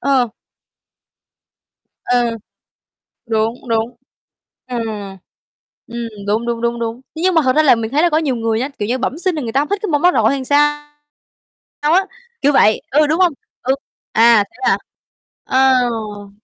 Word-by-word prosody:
ờ. 255 -5 +2 1.7
Ờ. 245 -1 +2 1.0
Đúng, 225 +2 -2
đúng. 225 +2 -1 0.7
Ờ. 250 -1 -5 1.1
Ừm, 235 0 -5 0.2
đúng, 220 +3 0
đúng, 235 -1 -2
đúng, 235 0 -1
đúng. 230 +1 -4 0.2
Thế 320 - -4
nhưng 370 0 +2
mà 320 - +4
thật 255 +2 +2
ra 310 - +5
là 275 - +6
mình 225 -1 -3
thấy 295 +5 +2
là 345 - +3
có 305 - +3
nhiều 285 -6 -1
người 225 0 -1
á, 265 - -1
kiểu 205 - -2
như, 255 +2 0
bẩm 265 +4 -2
sinh 365 -1 0
là 300 - -3
người 225 -2 -4
ta 275 - +2
hông 295 - -2
thích 405 - 0
cái 425 - -2
môn 295 0 +1
đó 360 - +6
rồi - - +2
hay 275 -1 -2
sao 295 +1 +2 0.9
sao 300 +2 +2
á? 385 +2 +3 0.4
Kiểu 290 - +4
vậy, 215 -5 +4
ừ, 300 +2 +4
đúng 315 +3 0
hông? 355 -3 +4 0.3
Ừ, 265 +2 +1 0.4
à, 230 -2 +5
thế - - -21
hả? - - +4 0.7
À, 260 -1 +3
ồ. 210 -3 -6
255 Hz, 185 wpm, -18 LUFS, 230-295 Hz, 1.7 s, là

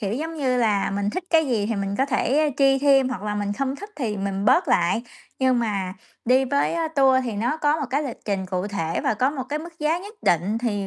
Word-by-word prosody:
kiểu 200 -1 -2
giống 320 +4 -4
như 260 -5 0
là, 210 -5 +1
mình 200 +1 -1
thích 370 +10 -4
cái 320 -2 +4
gì 215 -4 0
thì 225 - -1
mình 200 -1 -2
có 270 - +2
thể 290 +2 +1
chi 270 -1 +4
thêm, 270 -2 +4
hoặc 250 -5 -5
là 210 0 -2
mình 205 -1 -2
không 270 +5 -2
thích 410 +5 -9
thì 225 -7 -2
mình 195 0 -3
bớt 345 - +4
lại, 185 0 +2 0.4
nhưng 260 -2 +3
mà 200 -5 -2 0.3
đi 255 +3 +4
với, 280 +4 0
a, 330 -1 -1
tour 270 -4 +4
thì 235 - -3
nó 235 +9 -1
có 305 0 +1
một 285 - -2
cái 280 +3 +1
lịch 270 -5 -5
trình 195 -2 -2
cụ 185 +1 -2
thể 165 -5 -2
và - - 0
có 255 +5 +1
một 275 -3 -4
cái 295 - -2
mức 330 +1 -10
giá 310 +3 +1
nhất 410 +4 -10
định 180 +6 +1
thì 205 -5 -2
250 Hz, 260 wpm, -23 LUFS, 205-290 Hz, 0.4 s, cái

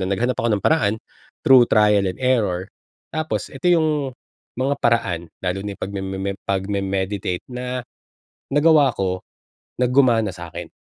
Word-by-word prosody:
na 95 - -1
naghanap 120 +5 0
ako 120 - +1
ng - - -8
paraan 150 -10 +3 0.5
through 130 -3 +7
trial 105 -2 +4
and 90 - -5
error 105 -7 +1 0.4
tapos 155 0 -2
ito 180 - -5
yung 150 -5 +1 0.5
mga 135 +2 +1
paraan 110 -8 +2 0.2
lalo 90 +1 -1
na 100 - -3
yung - - -22
pagmemem 95 0 -3
pagme-meditate 95 -1 -2
na 125 0 -4 0.7
nagawa 145 -2 +5
ko, 95 -1 -1 0.6
na 125 - +3
gumana 120 -5 +3
sa'kin. 85 0 -8
105 Hz, 140 wpm, -21 LUFS, 95-130 Hz, 0.7 s, through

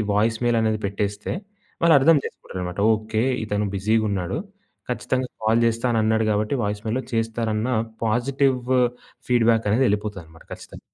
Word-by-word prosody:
Voice 110 +2 +2
mail 120 -1 +2
అనేది 110 -1 +1
పెట్టేస్తే 100 +1 -2 0.5
వాళ్ళు 165 -2 +6
అర్థం 155 +4 +5
చేసుకుంటారన్నమాట. 90 +1 -6
ఒకే 110 +1 -2 0.2
ఇతను 105 -1 -1
బిజీగా 110 +3 +1
ఉన్నాడు. 95 - -2 0.5
ఖచ్చితంగా 125 +1 -1
కాల్ 110 +2 +3
చేస్తానన్నాడు 110 -1 +1
కాబట్టి 105 +5 0
వాయిస్ 105 +1 -2
మెయిల్‌లో 125 +4 -1
చేస్తారన్న 115 0 -1 0.4
పాజిటివ్ 130 +4 +1 0.7
ఫీడ్‌బ్యాక్ 115 -2 +3
అనేది 125 +5 +3
వెళ్ళిపోతుందనమాట, 100 -6 -3
ఖచ్చితంగా. - - -10
110 Hz, 125 wpm, -23 LUFS, 105-120 Hz, 0.7 s, వాళ్ళు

